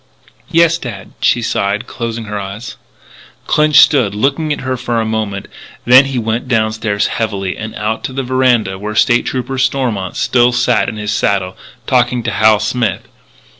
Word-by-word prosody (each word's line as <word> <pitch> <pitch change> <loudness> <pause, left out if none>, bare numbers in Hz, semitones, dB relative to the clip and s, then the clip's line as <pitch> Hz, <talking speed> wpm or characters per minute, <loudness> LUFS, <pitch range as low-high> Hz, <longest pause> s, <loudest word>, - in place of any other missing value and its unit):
"Yes, 165 0 +3
dad," 100 - -8
she 120 - +2
sighed, 105 +2 -1
closing 115 -2 -5
her 105 -1 -4
eyes. 100 +4 -7 0.7
Clinch 150 0 +2
stood 130 -10 +5
looking 145 +7 0
at 145 - -2
her 130 0 -2
for 120 -1 -2
a 110 - -1
moment, 110 -3 -3 0.4
then 130 +3 +7
he 135 -1 -3
went 115 +2 -2
downstairs 110 -3 0
heavily, 100 -5 -2
and 110 0 -7
out 110 +1 -3
to 130 - -5
the 135 +1 -2
veranda 125 -7 +1
where 105 +1 -5
State 120 +2 +3
Trooper 130 +1 -3
Stormont 120 -9 -1
still 120 0 +2
sat 120 -4 +1
his 105 -1 -4
saddle, 95 -3 0 0.3
talking 125 -1 +1
to 115 - -2
Hal 110 0 +4
Smith. 110 -1 -1
115 Hz, 165 wpm, -15 LUFS, 105-130 Hz, 0.7 s, then